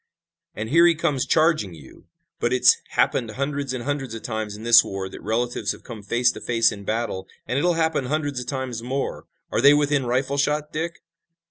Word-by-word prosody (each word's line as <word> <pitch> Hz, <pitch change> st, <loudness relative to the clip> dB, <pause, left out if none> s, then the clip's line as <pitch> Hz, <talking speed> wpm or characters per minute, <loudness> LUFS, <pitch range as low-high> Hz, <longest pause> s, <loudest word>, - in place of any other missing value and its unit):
"And 110 Hz, +2 st, -4 dB
here 170 Hz, +3 st, +6 dB
he 170 Hz, -, +4 dB
comes 150 Hz, -5 st, -1 dB
charging 155 Hz, -, +2 dB
you! 70 Hz, -4 st, -16 dB, 0.3 s
But -, -, 0 dB
it's -, -, +5 dB, 0.2 s
happened 120 Hz, -4 st, +1 dB
hundreds 140 Hz, +3 st, -3 dB
and 130 Hz, -2 st, -4 dB
hundreds 135 Hz, -4 st, -3 dB
of 115 Hz, -, -8 dB
times 110 Hz, -3 st, -4 dB
in 110 Hz, -, -10 dB
this 120 Hz, 0 st, +7 dB
war 95 Hz, -1 st, -5 dB
that 95 Hz, -, -10 dB
relatives 120 Hz, +3 st, -1 dB
have -, -, -15 dB
come 115 Hz, -4 st, -9 dB
face 120 Hz, +5 st, +2 dB
to -, -, -10 dB
face 115 Hz, -1 st, +2 dB
in 100 Hz, -2 st, -8 dB
battle, 110 Hz, -4 st, -2 dB, 0.2 s
and 125 Hz, -, -1 dB
it'll 175 Hz, +3 st, +2 dB
happen 160 Hz, -4 st, 0 dB
hundreds 145 Hz, -1 st, -2 dB
of 125 Hz, -, -7 dB
times 130 Hz, -4 st, -4 dB
more. 130 Hz, +3 st, -4 dB, 0.2 s
Are -, -, +1 dB
they 140 Hz, +2 st, +7 dB
within 145 Hz, -3 st, +1 dB
rifle 130 Hz, +3 st, 0 dB
shot, 150 Hz, +1 st, 0 dB
Dick?" 165 Hz, +2 st, -4 dB
130 Hz, 205 wpm, -23 LUFS, 115-145 Hz, 0.3 s, this